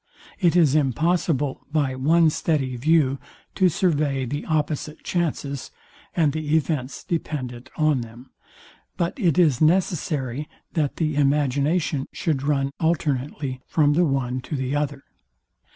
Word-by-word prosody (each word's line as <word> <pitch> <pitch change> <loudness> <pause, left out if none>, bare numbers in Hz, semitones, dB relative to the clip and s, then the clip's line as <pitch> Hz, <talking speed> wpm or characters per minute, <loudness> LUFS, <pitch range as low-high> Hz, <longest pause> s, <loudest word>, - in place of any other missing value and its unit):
It 175 -4 +3
is 160 -6 +5
impossible 150 0 +1
by 145 -4 +1
one 155 +5 +3
steady 140 -6 -1
view 140 0 +2 0.3
to 185 -2 +3
survey 145 -6 +1
the 145 +4 -4
opposite 155 0 -2
chances, 145 -6 -2 0.5
and 155 -4 +2
the 155 0 0
events 140 -4 -2
dependent 130 -7 -4
on 155 -4 +2
them; 120 +3 -11 0.7
but 170 -1 0
it 170 - +2
is 155 -8 +4
necessary, 155 -5 +1 0.2
that 150 -5 0
the 155 -3 -1
imagination 145 +1 +1
should 150 -5 -1
run 140 -1 0
alternately 145 -4 -1
from 150 -2 +3
the 175 +4 +3
one 130 -2 -1
to 150 - -5
the 130 +1 -2
other. 145 -1 -2
145 Hz, 130 wpm, -23 LUFS, 135-160 Hz, 0.7 s, is